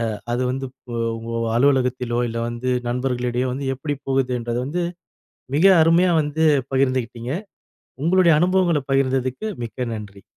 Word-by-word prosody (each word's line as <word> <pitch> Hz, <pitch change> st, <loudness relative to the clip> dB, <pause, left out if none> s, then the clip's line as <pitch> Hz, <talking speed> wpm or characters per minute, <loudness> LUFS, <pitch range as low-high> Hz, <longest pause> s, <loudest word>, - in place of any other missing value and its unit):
அ -, -, -8 dB, 0.2 s
அது 125 Hz, +1 st, 0 dB
வந்து 135 Hz, +1 st, -3 dB, 0.3 s
உ -, -, -2 dB, 0.2 s
உங்க 115 Hz, +1 st, -6 dB, 0.2 s
அலுவலகத்திலோ 125 Hz, -2 st, +2 dB
இல்ல 115 Hz, +1 st, -3 dB
வந்து 120 Hz, +2 st, -3 dB, 0.2 s
நண்பர்களிடையோ 125 Hz, 0 st, -1 dB
வந்து 135 Hz, +1 st, -4 dB
எப்புடி 145 Hz, +2 st, -3 dB
போகுதுன்றத 125 Hz, -3 st, 0 dB
வந்து, 175 Hz, +6 st, -2 dB, 0.7 s
மிக 160 Hz, -, +2 dB, 0.2 s
அருமையா 170 Hz, +3 st, +4 dB
வந்து 150 Hz, +2 st, -1 dB, 0.3 s
பகிர்ந்துகிட்டிங்க! 130 Hz, -2 st, 0 dB, 0.7 s
உங்களுடைய 175 Hz, 0 st, +5 dB
அனுபவங்கள 180 Hz, -4 st, +2 dB
பகிர்ந்ததுக்கு 130 Hz, -, 0 dB, 0.2 s
மிக்க 120 Hz, +1 st, -4 dB
நன்றி. 100 Hz, -3 st, -9 dB
130 Hz, 125 wpm, -22 LUFS, 120-145 Hz, 0.7 s, உங்களுடைய